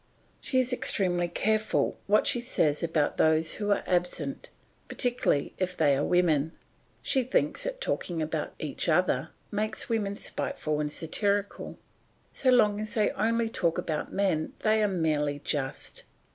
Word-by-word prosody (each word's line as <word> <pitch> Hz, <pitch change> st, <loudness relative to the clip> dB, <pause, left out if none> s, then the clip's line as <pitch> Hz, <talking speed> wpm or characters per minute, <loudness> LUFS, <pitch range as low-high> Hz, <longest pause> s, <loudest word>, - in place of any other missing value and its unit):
She 260 Hz, -, -2 dB
is 255 Hz, 0 st, +1 dB
extremely 180 Hz, -7 st, +2 dB
careful 215 Hz, +5 st, 0 dB
what 210 Hz, +1 st, +4 dB
she 240 Hz, -, +2 dB
says 160 Hz, -, 0 dB
about 160 Hz, -3 st, 0 dB
those 160 Hz, 0 st, +3 dB
who 205 Hz, -, -1 dB
are 205 Hz, -, +2 dB
absent, 175 Hz, -6 st, -2 dB, 0.4 s
particularly 245 Hz, -, 0 dB
if 185 Hz, -1 st, -2 dB
they 145 Hz, -3 st, +4 dB
are 140 Hz, -, 0 dB
women. 160 Hz, -4 st, +2 dB, 0.5 s
She 265 Hz, -, +2 dB
thinks 255 Hz, -, 0 dB
that -, -, -4 dB
talking 175 Hz, -, -2 dB
about 155 Hz, -1 st, -3 dB
each 155 Hz, +3 st, -2 dB
other 160 Hz, -3 st, +2 dB, 0.2 s
makes 215 Hz, +3 st, -2 dB
women 205 Hz, -3 st, -1 dB
spiteful 155 Hz, -6 st, -3 dB
and 150 Hz, -1 st, -1 dB
satirical; 200 Hz, +6 st, -2 dB, 0.6 s
so 260 Hz, -, +1 dB
long 215 Hz, -5 st, +4 dB
as 215 Hz, 0 st, -5 dB
they 215 Hz, -2 st, +2 dB
only 230 Hz, +2 st, +1 dB
talk 180 Hz, -8 st, 0 dB
about 155 Hz, -2 st, -3 dB
men 185 Hz, -6 st, 0 dB
they 220 Hz, 0 st, +3 dB
are 210 Hz, -, +3 dB
merely 155 Hz, -6 st, 0 dB
just. 140 Hz, -2 st, -4 dB
180 Hz, 150 wpm, -28 LUFS, 155-215 Hz, 0.6 s, what